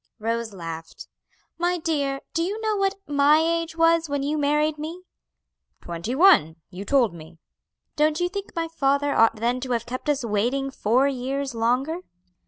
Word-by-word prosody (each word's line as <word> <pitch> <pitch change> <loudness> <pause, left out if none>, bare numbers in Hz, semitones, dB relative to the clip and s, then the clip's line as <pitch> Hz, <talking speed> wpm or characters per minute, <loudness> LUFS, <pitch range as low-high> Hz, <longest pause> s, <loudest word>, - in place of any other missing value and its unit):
Rose 230 0 -2
laughed. 165 -3 -8 0.5
"My 350 +1 +1
dear, 285 -5 -1
do 330 - 0
you 395 +6 -2
know 435 -1 0
what 390 -1 +1
my 290 +1 +4
age 330 +1 0
was 330 -1 +3
when 285 -1 -1
you 295 +2 -1
married 300 +1 +1
me?" 330 +4 -6 0.8
"Twenty 170 +9 -5
one, 310 - +5 0.2
you 185 +2 -7
told 250 -8 +2
me." 165 0 -12 0.6
"Don't 305 +1 +2
you 355 - +1
think 400 +2 -7
my 330 -1 -1
father 285 -2 +1
ought 225 0 +4
then 240 +3 -1
to 255 -1 -3
have 235 -1 -1
kept 255 +4 -5
us 280 -4 0
waiting 245 +6 0
four 255 +2 +2
years 270 +1 -3
longer?" 250 +8 0
280 Hz, 170 wpm, -24 LUFS, 235-325 Hz, 0.8 s, one